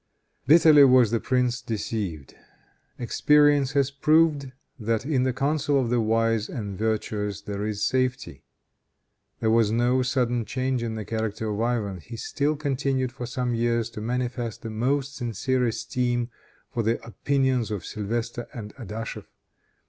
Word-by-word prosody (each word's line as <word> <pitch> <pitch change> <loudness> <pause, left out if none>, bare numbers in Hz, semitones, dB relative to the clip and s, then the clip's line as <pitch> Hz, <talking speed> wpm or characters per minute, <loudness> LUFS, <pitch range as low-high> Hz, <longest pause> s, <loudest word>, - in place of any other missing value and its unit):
Bitterly 155 -1 +7
was 125 -4 +6
the 115 - +1
prince 125 -1 0
deceived. 100 - -4 0.6
Experience 145 +3 +3
has 140 -1 +2
proved 150 -1 +2 0.3
that, 115 +2 -1
in 140 -4 +1
the 130 - +2
counsel 140 +1 +1
of 120 -3 -1
the 120 -1 +2
wise 115 0 +1
and 100 -4 -5
virtuous, 105 -1 -2
there 100 0 -4
is 105 -1 -1
safety. 130 -1 -1 1.0
There 110 - +2
was 115 -2 +4
no 120 +3 +2
sudden 125 -2 0
change 130 +3 -2
in 115 -1 -3
the 110 -2 -5
character 110 -1 -3
of 105 +1 -2
Ivan. 110 -6 -1
He 115 +8 -9
still 145 +6 -1
continued 135 -3 -1
for 125 -1 -6
some 125 0 -2
years 115 0 0
to 105 - -7
manifest 120 0 -3
the 115 - -5
most 135 +5 -1
sincere 125 +1 0
esteem 120 +1 -1 0.4
for 115 - 0
the 115 +1 0
opinions 130 0 0
of 105 -5 -4
Sylvestre 115 +2 -4
and 105 -3 -7
Adachef. 115 -2 -6
120 Hz, 150 wpm, -25 LUFS, 110-130 Hz, 1.0 s, Bitterly